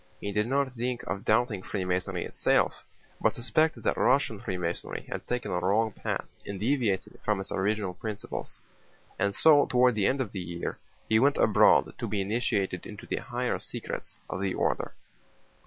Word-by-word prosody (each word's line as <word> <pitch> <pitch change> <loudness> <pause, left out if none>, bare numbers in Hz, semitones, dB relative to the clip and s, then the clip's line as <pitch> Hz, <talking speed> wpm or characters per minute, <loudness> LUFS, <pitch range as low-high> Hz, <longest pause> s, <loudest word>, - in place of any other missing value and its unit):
He 100 - -3
did 105 +2 +1
not 135 0 +1
think 120 0 -2
of 100 - -4
doubting 110 -3 +2
Freemasonry 90 -2 -2
itself, - - +1 0.4
but - - +3
suspected 155 +6 +1
that - - +1
Russian 125 -5 +2
Masonry 90 -3 -3
had - - -6
taken 125 0 -2
a 90 - +1
wrong 105 +5 +2
path - - -3 0.2
and 100 -1 -6
deviated 115 -4 0
from 105 -2 +1
its 95 - -6
original 100 -1 0
principles. 105 +2 -5 0.6
And 100 0 +1
so 150 -3 +6
toward 125 0 +4
the 105 -3 +2
end 135 - +1
of 120 -6 -2
the 95 - -4
year 85 0 -5 0.3
he 110 0 +4
went 140 +4 +4
abroad 105 0 +5
to - - -2
be 105 - -1
initiated 100 -3 -1
into - - -9
the - - -2
higher - - -2
secrets - - -5
of 95 - -4
the 95 -2 -1
order. - - -1
105 Hz, 170 wpm, -28 LUFS, 95-125 Hz, 0.6 s, so